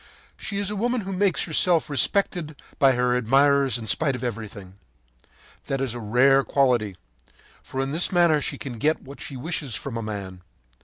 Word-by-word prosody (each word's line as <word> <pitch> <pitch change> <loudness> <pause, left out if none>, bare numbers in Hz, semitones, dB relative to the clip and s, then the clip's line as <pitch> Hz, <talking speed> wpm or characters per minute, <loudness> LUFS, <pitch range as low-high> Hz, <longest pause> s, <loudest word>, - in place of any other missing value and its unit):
She 200 - -4
is 200 0 -1
a - - -3
woman 240 +3 0
who 195 0 -6
makes 185 -4 +2
herself 170 +1 +2
respected 155 - 0 0.2
by 135 -1 +5
her 125 0 +1
admirers 135 +1 +3
in 115 - -7
spite 140 +3 +1
of 125 - -7
everything. 105 -5 -6 0.9
That 135 - -2
is 130 -3 -2
a 120 - -6
rare 130 +5 +4
quality, 120 -10 +1 0.6
for 130 - -7
in 135 0 -2
this 165 +6 0
manner 170 -4 +4
she - - -3
can 120 -5 -7
get 155 +6 +1
what 140 +1 -11
she 135 - -6
wishes 140 -2 -3
from 130 -4 -5
a - - -3
man. 100 -4 -6
135 Hz, 185 wpm, -24 LUFS, 120-160 Hz, 0.9 s, by